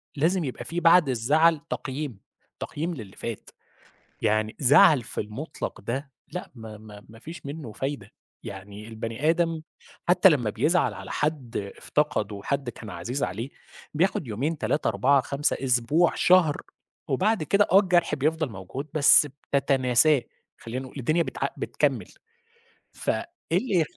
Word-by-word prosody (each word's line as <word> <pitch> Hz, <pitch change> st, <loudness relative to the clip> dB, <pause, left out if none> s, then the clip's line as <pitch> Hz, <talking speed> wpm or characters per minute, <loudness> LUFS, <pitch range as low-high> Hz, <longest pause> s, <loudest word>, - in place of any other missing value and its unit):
لازم 170 Hz, +5 st, +1 dB
يبقى 130 Hz, -4 st, -5 dB
فيه 175 Hz, +1 st, -3 dB
بعد 165 Hz, -3 st, +6 dB
الزعل 150 Hz, +6 st, +3 dB
تقييم، 135 Hz, -5 st, -4 dB, 0.4 s
تقييم 165 Hz, +4 st, -3 dB
للي 110 Hz, -, -9 dB
فات. 115 Hz, -3 st, -6 dB, 0.7 s
يعني 110 Hz, 0 st, +1 dB
زعل 145 Hz, 0 st, +6 dB
في 115 Hz, -, -4 dB
المطلق 110 Hz, +10 st, -6 dB
ده 135 Hz, +7 st, -4 dB, 0.2 s
لأ 180 Hz, -, -6 dB
ما 110 Hz, -2 st, -9 dB
ما 105 Hz, -1 st, -13 dB
ما 115 Hz, +1 st, -14 dB
فيش 165 Hz, +6 st, -10 dB
منه 140 Hz, -4 st, -6 dB
فايدة 135 Hz, -3 st, -5 dB, 0.3 s
يعني 100 Hz, +2 st, -9 dB
البني 115 Hz, +6 st, -2 dB
آدم 165 Hz, -1 st, +1 dB, 0.5 s
حتى 180 Hz, +1 st, +7 dB
لمّا 130 Hz, -9 st, +1 dB
بيزعل 155 Hz, -, +1 dB
على -, -, -8 dB
حد 150 Hz, -6 st, -2 dB, 0.2 s
افتقده، 105 Hz, -9 st, -1 dB
حد 140 Hz, -2 st, -2 dB
كان 115 Hz, -2 st, -10 dB
عزيز 100 Hz, +10 st, -4 dB
عليه 110 Hz, +8 st, -3 dB, 0.4 s
بياخد 165 Hz, -2 st, 0 dB
يومين 135 Hz, +9 st, -2 dB
3 145 Hz, -1 st, -1 dB
4 125 Hz, +6 st, +3 dB
5 140 Hz, +3 st, -1 dB
أسبوع، 135 Hz, +6 st, +2 dB
شهر، 175 Hz, -5 st, +4 dB, 0.5 s
وبعد 190 Hz, -, +1 dB
كده 200 Hz, +6 st, +3 dB
آه 190 Hz, -, +8 dB
الجرح 180 Hz, -5 st, +2 dB
بيفضل 155 Hz, +1 st, 0 dB
موجود 110 Hz, +8 st, -7 dB
بس 150 Hz, 0 st, +6 dB, 0.3 s
بتتناساه، 135 Hz, 0 st, +3 dB, 0.3 s
خلّينا 125 Hz, +3 st, -6 dB
نقول 130 Hz, -, -9 dB
الدنيا 155 Hz, +7 st, +1 dB
بتع -, -, -3 dB
بتكمّل -, -, -1 dB, 0.8 s
فإيه -, -, -2 dB, 0.3 s
اللي 180 Hz, -1 st, +2 dB
140 Hz, 140 wpm, -26 LUFS, 115-160 Hz, 0.8 s, آه